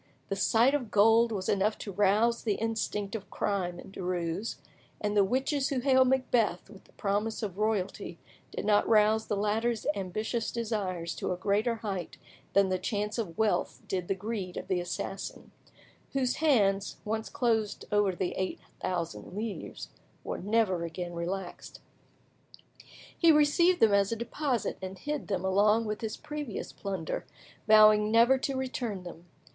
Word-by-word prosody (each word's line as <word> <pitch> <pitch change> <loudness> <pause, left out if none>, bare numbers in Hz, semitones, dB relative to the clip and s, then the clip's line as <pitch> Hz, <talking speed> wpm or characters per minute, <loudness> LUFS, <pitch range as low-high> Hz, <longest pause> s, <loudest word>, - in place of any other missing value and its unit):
The 195 - 0
sight 230 +6 +3
of 260 -6 -1
gold 225 +3 +5
was 190 -3 -3
enough 205 +2 +1
to 205 - -6
rouse 210 +4 +2
the 210 -3 0
instinct 210 -3 -2
of 215 -3 -6
crime 180 -4 -2
in - - -11
Derues, 180 +2 -3 0.4
and 210 0 -1
the 205 - +6
witches 265 +6 0
who 275 -3 0
hailed 260 0 +4
Macbeth 240 -7 +1
with 200 - -15
the - - -23
promise 210 +3 -1
of 200 -2 -4
royalty 210 -3 -1 0.3
did - - -5
not 205 -1 +3
rouse 220 0 +4
the 205 - -1
latter's 220 +3 0
ambitious 215 +4 -2
desires 195 -8 -2
to - - -2
a 180 - -1
greater 210 +5 +1
height 200 -6 -5 0.4
than 200 -1 +4
the 185 0 0
chance 210 +2 -2
of 170 -7 -4
wealth 220 -1 0
did 180 -2 -2
the 195 - 0
greed 195 -2 -4
of - - -6
the 185 - +1
assassin; 175 +2 -5 0.6
whose 260 -2 0
hands, 205 -10 +2
once 220 +1 -2
closed 220 -4 0
over 205 -3 +2
the 180 0 -1
eight 190 - -2 0.2
thousand 170 - -4
livres, 210 -6 -5 0.3
were - - -4
never 200 -3 +1
again 175 +1 -5
relaxed. 175 +2 -5 1.4
He 335 -2 +5
received 320 +4 +4
them 220 -2 +5
as 200 0 +3
a - - 0
deposit, 240 +1 -2
and 190 0 -6
hid 295 +9 -4
them 190 -2 -2
along 210 +4 +3
with 210 0 -3
his 220 -1 -4
previous 295 -7 -6
plunder, 190 -5 -4 0.4
vowing 215 -1 +7
never 235 +4 +5
to 270 0 -2
return 245 -7 -3
them. 175 -1 -10
210 Hz, 160 wpm, -29 LUFS, 190-230 Hz, 1.4 s, vowing